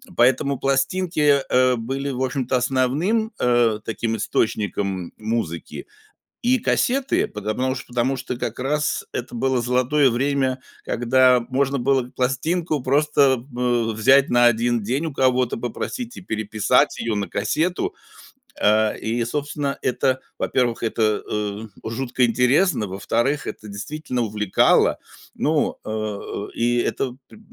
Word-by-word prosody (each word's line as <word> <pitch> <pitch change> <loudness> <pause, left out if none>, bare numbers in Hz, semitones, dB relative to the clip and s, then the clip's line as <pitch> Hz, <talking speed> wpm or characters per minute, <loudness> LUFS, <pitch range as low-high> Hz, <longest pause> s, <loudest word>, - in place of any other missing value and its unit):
Поэтому 130 +2 +2
пластинки, 145 +2 +2
э, 130 0 +4
были, 135 +5 -3
в 130 0 -2
общем-то, 130 -1 0
основным, 140 - +1
э, 120 -3 +2
таким 115 0 -2
источником 100 -4 -1
музыки 110 -7 -4 0.6
и 250 +2 +3
кассеты 265 +4 +1
пото 105 +1 -4
потому 130 +3 -1
что, 130 - -8
потому 125 +2 0
что 130 0 -4
как 115 0 -4
раз 150 +4 -1
это 120 - -5
было 130 +1 +1
золотое 130 +4 +2
время, 130 +1 0 0.2
когда 125 +1 +3
можно 135 +1 +1
было 130 0 +1
пластинку 145 +5 -1
просто, 140 -2 +2
э, 120 -2 +1
взять 130 +6 +4
на 120 0 +4
1 120 0 +2
день 130 +9 -1
у 155 - -5
кого-то 130 -2 +1
попросить 230 - -5
и - - -8
переписать 110 - +1
её 115 -1 -1
на 100 -1 -2
кассету. 175 - -1 0.7
Э, 110 +1 +3
и 115 +2 -1
собственно 145 +2 -3
это, 130 +1 +1 0.2
во-первых, 120 -3 0
это, 110 -2 0
э, 105 0 -3 0.2
жутко 125 +2 -1
интересно, 125 - +2
во-вторых, 115 +9 -1
это 110 - -7
действительно 125 +5 -4
увлекало, 105 -3 +2 0.4
ну, 155 0 0
э - - -6
э, 105 -1 -4
и 120 +1 +1
это 125 +1 -1
пр - - -15
125 Hz, 135 wpm, -22 LUFS, 115-140 Hz, 0.7 s, э